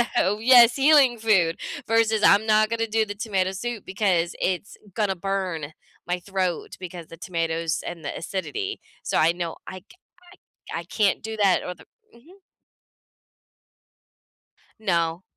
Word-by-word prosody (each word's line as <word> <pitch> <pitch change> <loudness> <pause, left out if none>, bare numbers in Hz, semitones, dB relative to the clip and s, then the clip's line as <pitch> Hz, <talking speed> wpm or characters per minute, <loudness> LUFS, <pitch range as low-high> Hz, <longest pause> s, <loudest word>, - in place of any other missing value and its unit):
So 205 +3 +2
yes, 240 0 +7
healing 275 -4 +5
food, 190 -7 +2 0.3
versus 225 -1 +2
I'm 205 +2 +5
not 215 0 +4
gonna 225 0 -1
do 220 0 +1
the 205 - -6
tomato 200 -3 -1
soup, 225 +2 -5
because 185 -3 0
it's 190 +4 -2 0.2
gonna 200 -4 0
burn 180 -5 -3 0.3
my 180 0 0
throat, 185 -2 -3
because 175 -3 -8
the 165 - -12
tomatoes 165 -2 -2
and 165 -3 -7
the - - -4
acidity. 390 - -4 0.2
So, - - -1
I 165 +2 +4
know 170 -2 -5
I 185 - -8
ca 290 - -21 0.8
I - - -2
I - - -7
can't 200 0 +1
do 220 0 -5
that, 200 -4 +2
or 180 - -4
the - - -17 0.3
mhm. 335 +12 -19 2.4
No. 170 -4 0
195 Hz, 150 wpm, -24 LUFS, 175-220 Hz, 2.4 s, yes